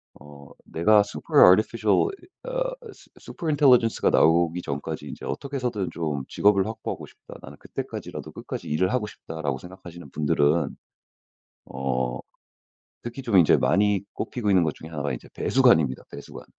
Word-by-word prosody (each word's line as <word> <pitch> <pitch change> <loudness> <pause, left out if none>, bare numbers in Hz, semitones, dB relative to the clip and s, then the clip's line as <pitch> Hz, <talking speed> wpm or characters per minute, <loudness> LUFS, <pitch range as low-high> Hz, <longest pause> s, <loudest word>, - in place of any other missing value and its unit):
어 70 0 -14 0.2
'내가 105 +6 +4
super - - +1
artificial 110 - +3
이 390 -2 -14 0.2
어 - - -1 0.2
su - - -19
super 165 - -8
intelligence가 130 -6 +4
나오기 85 +1 +3
전까지 70 -3 -5
이제 - - -8
어떻게 140 0 -5
해서든 120 -7 -2
좀 75 -5 -3
직업을 100 -2 +3
확보하고 110 +1 -5
싶다. - - -15
나는 - - -12
그때까지라도 - - -7
끝까지 - - -7
일을 90 +5 +1
하고 125 -4 0
싶다.'라고 80 -8 -5
생각하시는 85 -2 -12
분들은 75 +1 +1 0.9
어 65 -2 -2 0.8
특히 120 +3 -7
좀 115 -6 +2
인제 85 -4 +6
많이 100 0 +2
꼽히고 115 -5 -3
있는 95 -3 +4
것 80 - -2
중에 80 - -11
1 80 -3 -5
가 70 -1 -2
이제 - - -8
배수관입니다, 80 - +3
배수관. 70 0 -10
90 Hz, 430 characters per minute, -25 LUFS, 75-115 Hz, 0.9 s, 인제